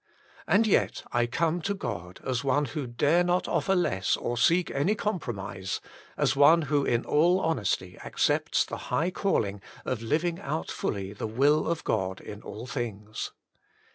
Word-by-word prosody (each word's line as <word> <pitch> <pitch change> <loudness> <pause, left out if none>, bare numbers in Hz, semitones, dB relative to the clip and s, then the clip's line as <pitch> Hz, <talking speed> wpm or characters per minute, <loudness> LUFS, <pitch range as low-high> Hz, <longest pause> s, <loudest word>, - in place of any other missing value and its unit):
And 215 +3 +4
yet 215 - +2
I 120 -1 +2
come 165 +7 0
to 200 +5 -1
God 90 - -6
as 130 0 -1
one 140 +2 +2
who 135 +2 -4
dare 145 +8 +3
not 180 +1 +1
offer 195 - +1
less 95 - +1
or 120 - -2
seek 170 +8 +3
any 170 +10 +1
compromise, 100 - -3 0.4
as - - +2
one 155 +4 +6
who 145 0 +1
in 120 -2 +1
all 175 +5 +4
honesty 100 - -1
accepts - - +1
the - - -5
high 170 +5 +1
calling 105 - 0 0.2
of 125 -3 -2
living 165 +8 0
out 80 - -3
fully 100 0 -3
the 105 - -4
will 140 +7 +3
of 165 -1 -1
God 95 -3 -1
in 105 0 -9
all 110 +4 -8
things. 110 -5 -4
135 Hz, 165 wpm, -28 LUFS, 105-170 Hz, 0.4 s, one